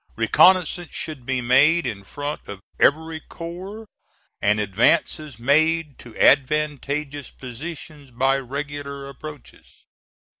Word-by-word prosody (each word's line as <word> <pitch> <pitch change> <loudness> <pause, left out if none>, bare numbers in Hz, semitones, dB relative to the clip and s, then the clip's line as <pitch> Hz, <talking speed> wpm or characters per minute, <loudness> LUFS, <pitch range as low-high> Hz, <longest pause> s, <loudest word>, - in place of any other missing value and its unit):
Reconnoissances 180 -2 +3
should 140 -6 -6
be 130 -1 0
made 140 +8 +4
in 105 -5 -4
front 145 +9 -6
of 100 -1 -7 0.2
every 160 +2 +2
corps 185 +8 -8 0.6
and 105 +1 +3
advances 120 - +1
made 150 +4 +2
to 120 -3 -12
advantageous 145 0 +1
positions 145 +3 -9
by 135 +3 +1
regular 140 +1 -6
approaches. 150 +1 -12
145 Hz, 105 wpm, -23 LUFS, 130-160 Hz, 0.6 s, made